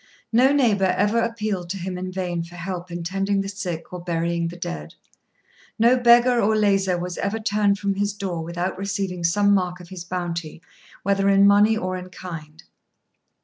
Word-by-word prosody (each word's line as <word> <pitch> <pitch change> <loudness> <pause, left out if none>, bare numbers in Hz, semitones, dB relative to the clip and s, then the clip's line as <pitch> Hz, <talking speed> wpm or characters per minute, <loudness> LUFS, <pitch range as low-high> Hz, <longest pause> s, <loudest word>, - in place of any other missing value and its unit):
No 255 +4 +5
neighbour 205 -10 +3
ever 210 +4 +2
appealed 215 -6 -2
to 195 - -3
him 185 0 -4
in 185 +1 -5
vain 180 -2 -2
for 170 +1 -12
help 180 0 -5
in 175 0 -5
tending 195 +3 0
the 195 - -4
sick 180 -4 -5
or 180 -1 -6
burying 170 0 -1
the 170 +1 -7
dead. 75 - -6 0.8
No 235 +3 +5
beggar 240 0 +5
or 215 +1 +2
lazar 195 -3 +2
was 175 0 -5
ever 200 +3 -1
turned 205 -2 +1
from 200 -1 -1
his 200 +1 -1
door 190 -5 -4
without 175 +3 -3
receiving 195 -3 -3
some 200 +4 +3
mark 180 -2 0
of 175 -1 -12
his 185 -3 -7
bounty, 175 -3 -4 0.4
whether 195 0 +2
in 195 0 +5
money 205 +2 +5
or 185 -3 -2
in 180 0 -8
kind. 160 -4 -9
190 Hz, 185 wpm, -23 LUFS, 175-205 Hz, 0.8 s, No